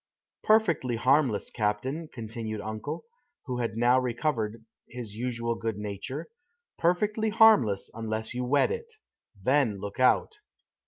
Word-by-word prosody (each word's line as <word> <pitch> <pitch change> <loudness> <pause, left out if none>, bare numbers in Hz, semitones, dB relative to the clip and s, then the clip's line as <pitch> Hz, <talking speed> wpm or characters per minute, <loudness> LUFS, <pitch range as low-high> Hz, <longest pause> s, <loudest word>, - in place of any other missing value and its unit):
"Perfectly 175 - +3
harmless, 130 -2 +2
captain," 125 +9 -1
continued 110 -2 -5
uncle, 110 +9 -5 0.4
who 125 -3 -3
had 115 -2 -2
now 120 +2 +4
recovered 115 -3 -2 0.2
his 120 -4 -7
usual 115 0 -2
good 115 -2 -3
nature. 105 - -5 0.5
"Perfectly 210 +6 +1
harmless 205 - +5
unless 110 0 -3
you 125 +1 -2
wet 140 - +3
it. 465 0 -5 0.5
Then 130 -5 +2
look 100 +3 -7
out." 130 - +3
120 Hz, 120 wpm, -28 LUFS, 110-150 Hz, 0.5 s, harmless